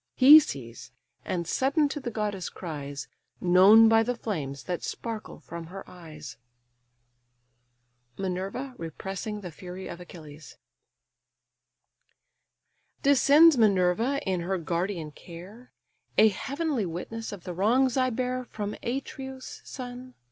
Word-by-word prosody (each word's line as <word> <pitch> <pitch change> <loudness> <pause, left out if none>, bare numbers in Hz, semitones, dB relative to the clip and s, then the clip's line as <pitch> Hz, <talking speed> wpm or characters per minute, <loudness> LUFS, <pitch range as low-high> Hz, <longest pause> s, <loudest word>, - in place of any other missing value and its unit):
He 285 +4 +10
sees, 120 - -7 0.3
and 170 -3 -3
sudden 280 - +2
to 295 - -4
the 260 -3 -4
goddess 210 -4 -3
cries, 145 -5 -7 0.3
Known 190 +5 +7
by 225 0 +5
the 245 +2 -1
flames 145 - -4
that 180 -2 -3
sparkle 225 -2 -6
from 170 0 -8
her 195 +3 -9
eyes: 155 -7 -11 1.8
MINERVA 195 +8 -4
REPRESSING 195 +6 -5
THE 180 -3 -7
FURY 185 +2 -8
OF 170 - -8
ACHILLES 155 -4 -12 2.5
"Descends 285 +2 +6
Minerva, 215 +6 +3
in 185 -2 0
her 185 +3 -1
guardian 170 -1 -3
care, 185 +11 -12 0.5
A 220 +1 +7
heavenly 275 - -2
witness 225 +7 -6
of 200 -4 -9
the 180 - -5
wrongs 235 +8 +2
I 255 -1 +2
bear 255 +1 -2
From 210 -2 -5
Atreus' 265 +1 -6
son? 250 0 -8
205 Hz, 120 wpm, -27 LUFS, 175-250 Hz, 2.5 s, He